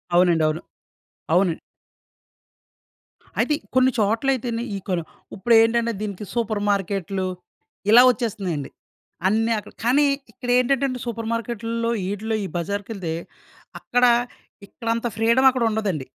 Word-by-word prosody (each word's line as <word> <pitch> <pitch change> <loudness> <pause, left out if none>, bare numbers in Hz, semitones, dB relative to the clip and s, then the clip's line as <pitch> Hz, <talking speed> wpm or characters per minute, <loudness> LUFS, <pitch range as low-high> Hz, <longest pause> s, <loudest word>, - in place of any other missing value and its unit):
అవునండి. 175 -3 +4
అవును. 155 +2 -3 0.7
అవునండి. 180 -3 +2 1.8
అయితే 300 - +2 0.2
కొన్ని 260 0 +5
చోట్ల 225 +5 +1
అయితేని 235 -2 -3
ఇకోను, 180 -3 -3 0.3
ఇప్పుడేంటంటే 230 +2 +3
దీనికి 210 -1 -5
సూపర్ 220 -3 -1
మార్కెట్లు 195 -1 -1 0.6
ఇలా 235 +3 +9
వచ్చేస్తున్నాయండి. 195 - -3 0.6
అన్నీ 225 +3 +1
అక్కడ. - - -13
కానీ 265 +5 +4 0.3
ఇక్కడేంటంటే 250 +2 +1
సూపర్ 230 -1 -4
మార్కెట్లలో 230 0 -2
వీటిలో 205 +4 -2
ఈ - - -3
బజార్‌కేళ్తే 195 -1 -3 0.7
అక్కడ 245 0 +2 0.6
ఇక్కడ 230 +2 -11
అంత 230 +1 -2
ఫ్రీడమ్ 235 +4 +4
అక్కడ 255 -2 -1
ఉండదండి. 200 -10 -2
225 Hz, 110 wpm, -23 LUFS, 195-235 Hz, 1.8 s, ఇలా